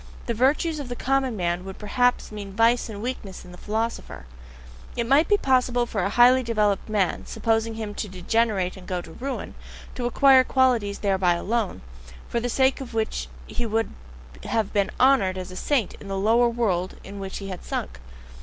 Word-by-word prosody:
The 235 - -1
virtues 295 +7 +1
of 275 -4 -6
the 245 - -4
common 265 -2 0
man 175 0 -1
would 190 0 -8
perhaps 245 +4 +1
mean 200 -2 -7
vice 230 +3 +3
and 210 -1 -7
weakness 235 -6 -5
in 180 - -12
a - - -11
philosopher; 220 - -4 0.7
it 235 - -1
might 280 +6 +4
be 410 - +4
possible 250 -5 +2
for 215 -4 -2
a 195 - 0
highly 245 +4 +6
developed 215 -4 0
man, 205 -4 0
supposing 225 0 0
him 215 -2 -5
to 210 - -4
degenerate 190 0 0
and 185 -2 -12
go 180 -2 -2
to 165 - -12
ruin, 270 +9 -5 0.4
to 245 -1 -2
acquire 265 +1 +6
qualities 245 -6 +2
thereby 190 -3 +2
alone, 210 - -2 0.4
for 235 - -1
the 245 +1 -2
sake 265 +2 +2
of 245 -3 -8
which 220 -1 -1 0.2
he 240 - -3
would 225 +1 0 0.5
have 220 -3 -1
to 200 -1 +3
be - - -11
honoured 250 -8 +4
as 185 0 -6
a - - -9
saint 245 0 0
in 200 - -10
the 195 0 -3
lower 230 +4 +3
world 195 -7 -1
into 200 +1 -9
which 195 -1 -5
he 195 -1 -7
had 185 - -7
sunk. - - -4
225 Hz, 195 wpm, -24 LUFS, 195-245 Hz, 0.7 s, highly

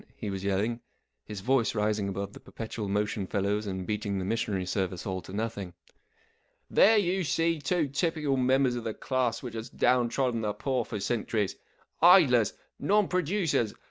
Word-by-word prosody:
" - - -35
he 105 - -5
was 95 -1 -5
yelling, 100 +4 0 0.5
his 105 -2 -7
voice 125 +1 +1
rising 105 -1 0
above 100 +1 -4
the - - -11
perpetual 110 -2 -6
motion 105 -1 -1
fellow's 105 +2 -1
and 95 -1 -4
beating 105 -1 -2
the 95 - -2
missionary 100 -3 -1
service 90 -1 -2
all 95 -1 -3
to - - -12
nothing. 100 -4 -4 0.9
44 - - -13
There 220 +2 +7
you 190 -1 +1
see 165 +1 +1
two 155 +2 +1
typical 150 0 0
members 130 0 +3
of 120 - -4
the 110 -2 -4
class 130 -2 -1
which 120 -3 -6
has 115 +1 -6
down 125 -1 +2
trodden 125 -3 0
the 105 -1 -1
poor 130 0 -1
for 105 - -5
cen¬ 110 +3 -2
turies. 105 -4 0 0.5
Idlers! 150 - +6 0.3
Non 210 0 +3
producers 175 - 0
115 Hz, 180 wpm, -28 LUFS, 100-135 Hz, 0.9 s, There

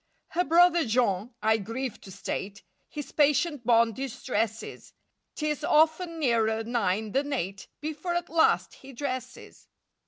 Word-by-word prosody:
Her 355 - +1
brother 345 +1 +5
Jean—I 220 -1 +1
grieve 230 +4 -5
to 190 - -11
state— 200 +2 -5 0.3
His 295 -2 -7
patient 295 -1 +2
bonne 230 -1 +4
distresses; 230 -3 -4 0.4
'Tis 305 -1 -2
often 320 +3 +3
nearer 225 -6 +1
nine 220 -2 -1
than 285 +4 0
eight 195 -6 -4
Before 310 +3 -3
at 345 0 -1
last 320 0 +2
he 270 0 -13
dresses. 255 0 -6
255 Hz, 125 wpm, -27 LUFS, 220-305 Hz, 0.4 s, brother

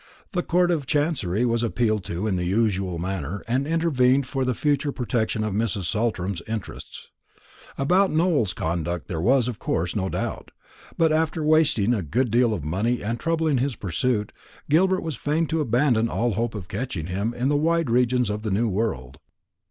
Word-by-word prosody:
The 180 -4 0
Court 175 0 +2
of 150 -6 -1
Chancery 135 - 0
was 115 -1 +1
appealed 110 -3 0
to 85 +5 -3
in 105 -4 0
the 90 - -1
usual 95 -2 0
manner, 90 0 -4
and 130 +4 0
intervened 140 -5 +2
for 135 0 -2
the 125 -1 0
future 145 +1 0
protection 115 -4 -1
of 110 -2 -2
Mrs. 105 -2 -1
Saltram's 100 -3 -1
interests. 110 -2 -7 0.7
About 185 +8 +3
Nowell's 155 - +1
conduct 85 +1 -2
there 80 -3 -2
was, 125 +5 +3
of 120 -6 -4
course, 85 +1 -1
no 95 -2 -1
doubt; - - -4 0.5
but 165 -1 +3
after 160 0 0
wasting 150 -8 +3
a 110 - 0
good 115 - 0
deal 120 0 +3
of 100 -8 -3
money 105 +11 -1
and 115 +3 -2
trouble 165 -1 0
in 145 -5 +2
his 135 0 -1
pursuit, 105 +4 -1 0.4
Gilbert 185 +4 +3
was 160 -7 -4
fain 155 +5 0
to 160 0 -1
abandon 120 -3 +2
all 120 +1 0
hope 115 +3 -2
of 95 -4 -6
catching 100 -7 -4
him 100 +6 -2
in 125 +2 0
the 145 - +2
wide 165 -2 +1
regions 125 -2 +2
of 105 +1 -3
the 110 - -3
new 110 +4 +1
world. 95 - -3
120 Hz, 185 wpm, -24 LUFS, 100-145 Hz, 0.7 s, About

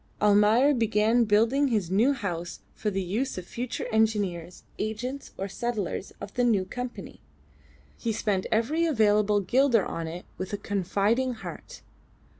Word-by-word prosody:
Almayer 210 +7 +5
began 225 0 +2
building 230 +7 +3
his 210 -8 -1
new 225 +8 +4
house 175 -8 -5
for 215 - -2
the 195 -1 -2
use 220 +9 -2
of 180 - -5
the - - -21
future 245 +1 -4
engineers, 205 -6 0 0.2
agents, 245 +6 -4
or 195 - -3
settlers 205 -2 -3
of 200 - -8
the 250 - +1
new 210 -6 +2
Company. 240 0 -7 0.8
He 230 - -1
spent 205 -3 -1
every 295 +10 +1
available 210 -6 +3
guilder 245 +2 +3
on 165 -1 -4
it 170 +3 -7
with 185 +2 -5
a - - 0
confiding 205 +7 0
heart. - - -9
215 Hz, 150 wpm, -27 LUFS, 195-240 Hz, 0.8 s, Almayer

